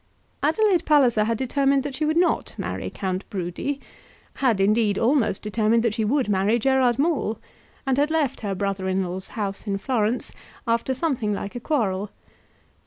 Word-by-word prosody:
Adelaide 355 +3 +3
Palliser 250 -9 +4
had 230 0 0
determined 275 +2 +1
that 285 -1 -4
she 305 +3 -1
would 310 +2 +1
not 350 0 +1
marry - - -4
Count 190 0 -3
Brudi; 190 +9 -3 0.6
had, 240 -7 +2
indeed, 210 +1 +2
almost 230 -5 +1
determined 220 +2 +2
that 230 -3 +1
she 225 0 -1
would 255 +4 +1
marry 205 +3 +2
Gerard 255 0 +2
Maule, 275 -8 0 0.5
and 270 0 +1
had 295 +1 +2
left 310 -5 0
her 200 -3 -2
brother 195 -1 -2
in 190 0 +1
law's 185 +1 -5
house 200 0 -3
in 195 -1 0
Florence 230 +1 -1 0.3
after 235 +2 0
something 255 -8 -1
like 200 0 -5
a - - -3
quarrel. 210 -8 -1
230 Hz, 170 wpm, -24 LUFS, 205-275 Hz, 0.6 s, Palliser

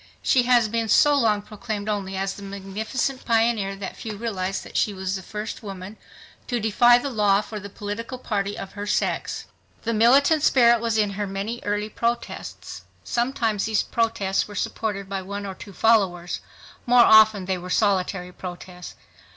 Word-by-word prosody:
She 255 - +4
has 240 -3 +5
been 225 0 -2
so 295 +7 +5
long 220 -7 +2
proclaimed 210 -1 -5
only 195 -2 -2
as 195 0 -1
the - - -11
magnificent 200 +7 -3
pioneer 225 -4 +1
that 195 0 -6
few 215 -2 -6
realize 195 -4 -3
that - - -13
she 205 - +1
was 190 0 -3
the 190 - -5
first 210 +3 -6
woman 195 -1 -8 0.5
to 245 -2 -1
defy 240 +3 +5
the 275 +3 -3
law 205 -3 +3
for 215 0 -7
the 200 0 -9
political 210 +5 -6
liberty 205 -4 -2
of 195 - -7
her 205 0 -6
sex. - - -1 0.4
The 230 - -1
militant 275 +8 +5
spirit 235 -5 +5
was 230 -2 0
in 210 -2 +2
her 205 +1 -3
many 200 +5 -4
early 210 +1 -1
protests. 235 +2 -4 0.2
Sometimes 235 -4 0
these 220 -1 +1
protests 225 -4 0
were 205 - -10
supported 205 -1 -3
by 195 -1 -3
one 200 +2 -6
or 195 - -5
two 200 - -11
followers; 190 -5 +2 0.5
more 245 0 +7
often 220 -3 +6
they 185 -1 -1
were 180 +1 -8
solitary 185 -2 0
protests. 180 0 -9
210 Hz, 175 wpm, -24 LUFS, 195-230 Hz, 0.5 s, more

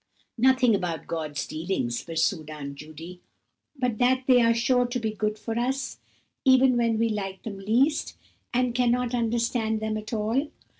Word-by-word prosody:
"Nothing 255 -1 +4
about 175 -6 -2
God's 155 -4 -3
dealings," 155 -8 -2
pursued 165 -1 -1
Aunt 145 -2 -6
Judy, 155 +5 -10 0.5
"but 250 -5 -1
that 255 +1 +3
they 250 -2 +6
are 230 0 +4
sure 245 +2 +2
to 245 +1 -2
be 220 -2 -1
good 215 0 -2
for 225 +2 -3
us, 265 +3 -2 0.4
even 260 -1 +5
when 230 -2 +2
we 230 +1 +2
like 195 -3 -4
them 200 -3 -6
least, 240 +10 +1 0.3
and 250 0 +1
cannot 245 0 +1
understand 230 -1 0
them 215 0 -2
at 215 0 -7
all. 230 +6 0
225 Hz, 160 wpm, -26 LUFS, 190-245 Hz, 0.5 s, they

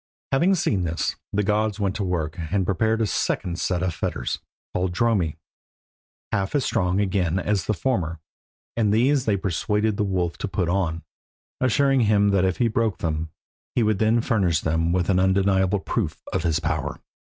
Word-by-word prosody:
Having 175 +8 +3
seen 100 - 0
this, 85 -1 -1 0.2
the 105 +1 +1
gods 105 +1 0
went 100 -2 0
to 105 - -1
work, 80 -4 -2 0.2
and 100 -2 +1
prepared 110 +5 +1
a - - +3
second 90 -1 -1
set 90 -1 0
of 90 -2 0
fetters, - - -3 0.3
called 90 0 -1
Dromi, 100 -9 +1 1.0
half 100 +6 -1
as 140 - +2
strong 95 -4 +1
again 95 -3 +1
as 100 +1 -1
the 110 - +1
former, 85 -5 -1 0.6
and 110 -3 +2
these 130 +5 +3
they 105 -3 +2
persuaded 105 +3 0
the - - +1
wolf 90 -4 -1
to - - -2
put 90 -2 -1
on, 85 -3 -1 0.6
assuring 135 +2 +3
him 105 -2 +3
that 95 -2 +3
if 95 -1 0
he 120 - +2
broke 110 -1 0
them 80 -1 -2 0.5
he 120 - +3
would 105 -2 +1
then 110 +2 +3
furnish 95 -10 +1
them 80 +1 0
with 90 0 +1
an 95 -2 +3
undeniable 95 +1 +2
proof 95 -5 -2
of - - +1
his 80 -2 +1
power. 80 -2 -2
95 Hz, 180 wpm, -24 LUFS, 85-110 Hz, 1.0 s, Having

